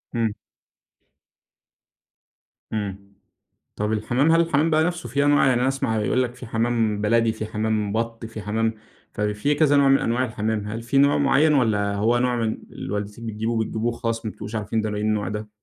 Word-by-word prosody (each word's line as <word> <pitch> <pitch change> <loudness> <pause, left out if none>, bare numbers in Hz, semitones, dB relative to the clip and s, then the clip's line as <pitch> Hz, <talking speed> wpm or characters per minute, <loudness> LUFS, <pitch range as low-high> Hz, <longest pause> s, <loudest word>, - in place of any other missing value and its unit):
إمم. 115 -3 0 2.4
إمم، 100 -1 -5 0.6
طب 105 +1 -1
الحمام 120 +8 +1
هل 165 - +5
الحمام 165 -1 +2
بقى 155 0 +3
نفسه 170 -8 -2
في 140 +3 +1
أنواع؟ 145 -1 +4
يعني 125 -2 +3
أنا 130 - +2
أسمع 135 -5 0
يقول 125 +4 +1
لك 120 0 -5
في 125 0 -10
حمام 115 -2 0
بلدي، 115 +1 +3
في 110 -1 -5
حمام 105 -1 -1
بط، 115 0 -3
في 110 -1 -7
حمام 110 +2 0 0.4
ففي 105 +8 0
كذا 145 -2 +4
نوع 140 -1 +5
من 135 0 +5
أنواع 120 +3 0
الحمام. 110 -2 -2
هل 115 +2 -4
في 125 +4 -1
نوع 140 +1 +5
معين، 145 +2 +3
والَّا 105 -6 +1
هو 115 +4 +2
نوع 125 0 +1
من 115 -2 -1
اللي 100 - -6
والدتِك 105 +3 -5
بتجيبه، 110 +1 -2
بتجيبه 110 0 -2
وخلاص 115 -1 -2
ما 110 - -2
بتبقوش 105 +2 -8
عارفين 110 +1 -1
ده 110 - -2
ايه 105 - -3
النوع 105 -1 0
ده؟ 105 0 -5
115 Hz, 190 wpm, -23 LUFS, 105-130 Hz, 2.4 s, هل